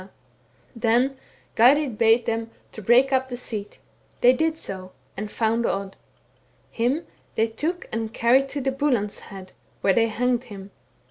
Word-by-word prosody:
* - - -37 0.3
Then 240 +4 +2 0.4
Geirrid 255 0 +4
bade 225 +1 +4
them 225 0 -2 0.2
break 240 +6 +3
up 260 0 +1
the 245 - -5
seat. 215 -4 -6 0.4
They 250 +1 +7
did 320 +4 +1
80, 190 -12 -7 0.3
and 210 +1 -5
found 230 +2 0
Odd. 195 0 -3 0.8
Him 255 +8 0 0.3
they 225 - +3
took 310 +11 -3
and 225 0 -3
carried 260 +4 +3
to 280 - -3
Buland's 265 -6 0
head, 190 -2 -11 0.3
where 195 - +3
they 230 +2 +3
hanged 245 +2 0
him. 200 -3 -10
235 Hz, 145 wpm, -24 LUFS, 220-260 Hz, 0.8 s, They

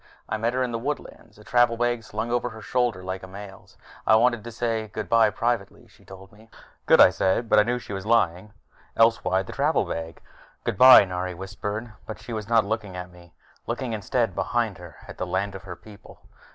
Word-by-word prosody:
I - - -2
met 115 +2 -1
her 130 - +1
in 125 - -2
the 115 - -3
woodlands, 120 -5 -6
a 105 - -15
travel 120 0 +2
bag 120 -1 0
slung 110 +2 -4
over 120 0 0
her 110 -1 -11
shoulder 120 -7 -1
like 95 0 -5
a 95 - -10
male's. 100 +1 -12 0.3
"I 110 - +6
wanted 120 -1 +2
to 120 - -8
say 115 -1 -2
goodbye 110 +1 +2
privately," 115 -1 -3
she - - -23
told 95 0 -13
me. 110 +2 -19 0.4
"Good," - - +6
I - - +8
said, 95 +5 0
but 105 - +5
I - - +6
knew 120 +3 -1
she 115 - -8
was 95 -1 -5
lying. 105 -3 +1 0.5
Else 115 0 +4
why 95 +1 +1
the - - -9
travel 150 +3 +1
bag? 80 0 -6 0.4
"Goodbye," 130 -5 +8
Nari 90 -1 -4
whispered, 105 +4 -6
but 110 - -6
she 120 - -9
was 110 -1 -5
not 115 -2 +4
looking 105 -3 -4
at 90 0 -7
me. 85 -2 -18 0.3
Looking, 120 0 -3
instead, 110 0 -1
behind 100 +1 -1
her, 85 -3 -12
at - - -11
the - - -3
land 100 +2 -2
of 95 - -8
her 90 -2 -7
people. 105 +1 -16
110 Hz, 215 wpm, -25 LUFS, 95-115 Hz, 0.5 s, I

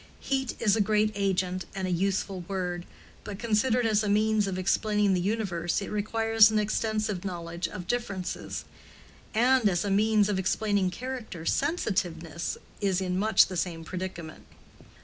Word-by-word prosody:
Heat 265 -2 -1
is 205 -3 +3
a 220 - +2
great 215 +1 +2
agent 185 -2 -1
and 190 -1 -2
a - - -2
useful 190 +1 -1
word, 180 -2 -3 0.4
but 200 - -6
considered 230 +2 +1
as 215 -2 +3
a 210 - -1
means 215 0 +2
of 190 -1 -3
explaining 205 +1 +2
the 180 - +1
universe 185 -4 -1
it 195 - -6
requires 225 +1 +4
an 220 - 0
extensive 215 -2 -1
knowledge 170 -2 -4
of 180 +1 -7
differences; 200 -4 -3 0.7
and 245 -1 +4
as 175 0 0
a 200 - -1
means 210 +1 +3
of 205 -2 0
explaining 200 0 +1
character 235 -6 -6
"sensitiveness" 175 - -1 0.2
is 195 -3 +1
in 185 -1 -1
much 215 +2 +5
the 185 - -7
same 165 -2 -2
predicament. 170 -2 -6
200 Hz, 155 wpm, -28 LUFS, 180-215 Hz, 0.7 s, much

